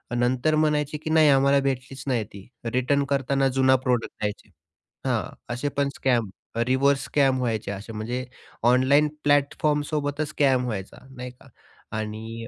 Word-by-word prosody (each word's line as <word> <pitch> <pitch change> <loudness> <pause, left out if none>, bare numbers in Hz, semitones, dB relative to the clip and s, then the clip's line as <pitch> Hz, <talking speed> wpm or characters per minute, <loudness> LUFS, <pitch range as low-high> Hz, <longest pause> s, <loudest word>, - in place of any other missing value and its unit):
नंतर 125 +5 +1
म्हणायचे 150 -1 +1
की 155 +1 -6
"नाही, 155 -1 +5
आम्हाला 140 0 +4
भेटलीच 135 -1 -3
नाही 120 -4 +1
ती." 100 -1 -13 0.2
रिटर्न 130 +4 +1
करताना 135 0 +1
जुना 130 0 +4
प्रॉडक्ट 125 -2 0
द्यायचे 105 0 -4 0.6
हां. - - +1 0.3
असे 125 +4 -2
पण 140 -1 +2
स्कॅम 120 -5 +1 0.4
रिव्हर्स 135 +2 +2
स्कॅम 135 -3 +2
व्हायचे 115 -5 -2
असे 100 +3 -7
म्हणजे 120 +4 -3 0.4
ऑनलाईन 130 +4 +4 0.2
प्लॅटफॉर्म 145 +1 +2
सोबतच 145 0 -2
स्कॅम 135 -4 +2
व्हायचा 100 -6 -5 0.2
नाही 125 0 -7
का? 125 - -20 0.5
आणि 110 +2 -5
130 Hz, 145 wpm, -25 LUFS, 120-140 Hz, 0.6 s, नाही